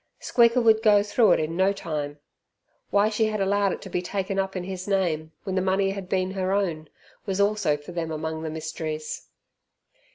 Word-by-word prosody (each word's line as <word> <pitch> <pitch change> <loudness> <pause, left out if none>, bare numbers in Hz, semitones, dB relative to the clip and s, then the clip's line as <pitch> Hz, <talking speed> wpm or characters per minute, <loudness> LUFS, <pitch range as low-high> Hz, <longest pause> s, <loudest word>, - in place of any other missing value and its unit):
Squeaker 235 +1 +4
would 220 -1 +5
go 210 -2 +5
through 215 +2 +4
it - - +2
in 155 +1 -2
no 190 +2 +3
time. 150 -6 -4 0.7
Why 200 +1 +3
she 220 +1 +1
had 215 -1 -1
allowed 200 0 +2
it - - -5
to 195 - -8
be 180 - 0
taken 195 +1 -2
up 195 0 -2
in 185 - -3
his 185 0 -6
name, 170 -6 0
when 190 - -3
the 185 - +1
money 190 +1 +1
had 195 -2 -6
been 185 -1 0
her 190 0 -1
own, 170 -6 -1 0.4
was 195 0 -1
also 200 -7 +2
for 145 +4 -11
them 170 -2 -3
among 160 0 -4
the 160 - -3
mysteries. 155 0 -5
190 Hz, 200 wpm, -25 LUFS, 160-200 Hz, 0.7 s, would